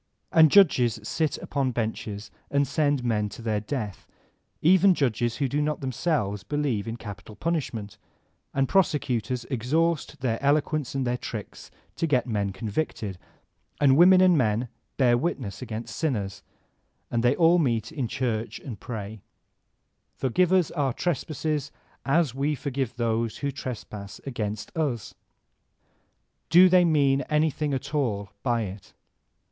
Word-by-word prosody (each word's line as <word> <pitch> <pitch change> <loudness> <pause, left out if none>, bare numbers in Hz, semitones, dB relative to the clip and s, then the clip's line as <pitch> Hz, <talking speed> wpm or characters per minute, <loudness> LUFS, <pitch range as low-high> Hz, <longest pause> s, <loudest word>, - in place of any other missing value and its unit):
And 160 -1 +7
judges 130 - +5
sit 155 +7 -1
upon 135 -3 -2
benches 110 -2 -4 0.2
and 140 0 +2
send 145 -2 +1
men 105 -3 0
to 115 - -10
their 110 -2 0
death, 105 -3 -5 0.3
— - - -46 0.3
even 185 +3 +6
judges 120 -4 0
who 140 - 0
do 145 +3 0
not 150 0 -1
themselves 130 - -1
believe 135 -6 -1
in 115 - -3
capital 105 -1 -9
punishment; 120 - -3 0.5
and 135 0 +1
prosecutors 125 - +1
exhaust 150 +5 0
their 115 -3 -1
eloquence 145 0 +1
and 135 -1 0
their 125 0 -1
tricks 110 -3 -7 0.3
to 165 - 0
get 130 -5 +2
men 105 -5 -1
convicted; 105 - -3 0.6
and 135 -2 +5
women 185 +4 +7
and 185 -2 +6
men 115 0 +1 0.3
bear 125 -3 +4
witness 125 - -3
against 115 -2 -6
sinners; 105 - -2 0.7
and 120 -1 0
then 120 - +4
they - - -4
all 170 +1 +5
meet 115 -7 0
in 140 -7 -2
church 115 -2 -2
and 115 -8 -8
pray, 110 -3 -6 1.0
''Forgive 170 +8 +2
us 185 -4 +3
our 140 -6 0
trespasses 155 -2 -2 0.4
of 150 -2 +2
we 140 +3 0
for 140 +1 -5
give 130 -2 -2
those 115 -1 -1
who 140 - 0
trespass 105 -6 -7
against 110 -5 -4
us 140 - -2 0.7
!'' - - -45
Do 180 +2 +8
they 180 -1 +5
mean 140 -4 +3
anything 150 -1 +1
at 135 +2 -4
all 105 -9 -1
by 120 -3 +1
it 95 -1 -8
130 Hz, 150 wpm, -26 LUFS, 110-150 Hz, 1.0 s, Do